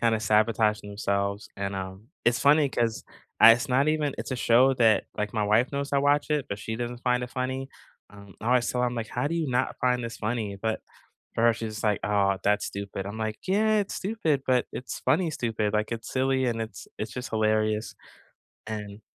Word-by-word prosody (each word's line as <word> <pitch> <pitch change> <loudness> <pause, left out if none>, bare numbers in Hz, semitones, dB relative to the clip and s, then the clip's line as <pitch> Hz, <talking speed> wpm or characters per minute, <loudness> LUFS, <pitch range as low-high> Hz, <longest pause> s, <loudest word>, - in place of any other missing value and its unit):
kinda 115 -2 +2
sabotaging 105 -1 +2
themselves, 100 0 -2
and, 100 0 -3
um, 95 +3 -7 0.2
it's 120 0 +3
funny 145 0 +5
'cause 115 -3 -1 0.4
I 115 - +11
it's 125 +4 -1
not 135 +4 +3
even 150 -2 0
it's - - -5
a 130 - -1
show 125 +3 +4
that, 115 -3 +3
like, 105 -1 -2
my 105 - +1
wife 110 +6 +2
knows 140 0 -3
I 140 - +4
watch 145 +2 +2
it, 150 -3 0
but 100 - -4
she 110 0 -4
doesn't 120 +1 -5
find 125 -1 +1
it 125 - -10
funny, 130 +1 -3 0.4
um, 100 -2 -14
I - - -6
always 125 -1 +3
tell 125 - -1
her, 125 - +3
I'm 120 - -2
like, 115 -2 -4
"How 125 +3 -2
do 165 - -1
you 165 -4 -1
not 125 +1 0
find 125 -1 +2
this 115 - -6
funny?" 110 -2 -2
But 110 +2 -2 0.5
for 115 - 0
her 115 - +5
she's 110 -1 -5
just - - -6
like, 105 -2 +2
"Oh, 100 -2 +2
that's 105 0 +2
stupid." 100 -1 -5
I'm 100 +2 -6
like, 110 -1 -3
"Yeah, 215 +3 +3
it's 200 - -3
stupid, 175 -10 -1
but 125 -1 +2
it's 125 - -6
funny 160 +6 +2
stupid, 110 -5 -1
like, 105 +2 0
it's 115 - -7
silly 130 0 +1
and 115 -2 -1
it's 110 - -7
it's 105 -1 -5
just 125 0 -5
hilarious." 110 0 0 0.7
And 105 -1 -6
115 Hz, 220 wpm, -27 LUFS, 105-130 Hz, 0.7 s, I